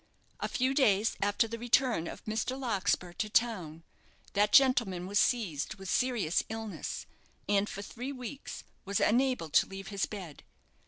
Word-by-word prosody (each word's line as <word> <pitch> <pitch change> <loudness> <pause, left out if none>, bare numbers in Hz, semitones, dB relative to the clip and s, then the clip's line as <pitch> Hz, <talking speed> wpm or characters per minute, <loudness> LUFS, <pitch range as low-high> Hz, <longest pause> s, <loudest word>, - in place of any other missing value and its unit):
A - - -1
few 260 +2 0
days 220 -6 +3
after 205 +3 +2
the 230 +1 -6
return 240 -7 +2
of - - -8
Mr. 220 +5 -2
Larkspur 195 -7 0
to 215 +4 -3
town, 180 -9 0 0.5
that 210 +1 +3
gentleman 235 -10 +4
was 200 +2 +1
seized 195 - 0
with 195 -2 -6
serious 235 -10 +1
illness, 220 -1 -5 0.4
and 205 0 +2
for 200 - -6
three 245 +6 -6
weeks 265 +1 -7 0.2
was 200 +1 -1
unable 250 -7 +2
to - - +4
leave 195 0 -8
his 200 -2 -1
bed. 185 -8 -8
210 Hz, 155 wpm, -31 LUFS, 195-245 Hz, 0.5 s, gentleman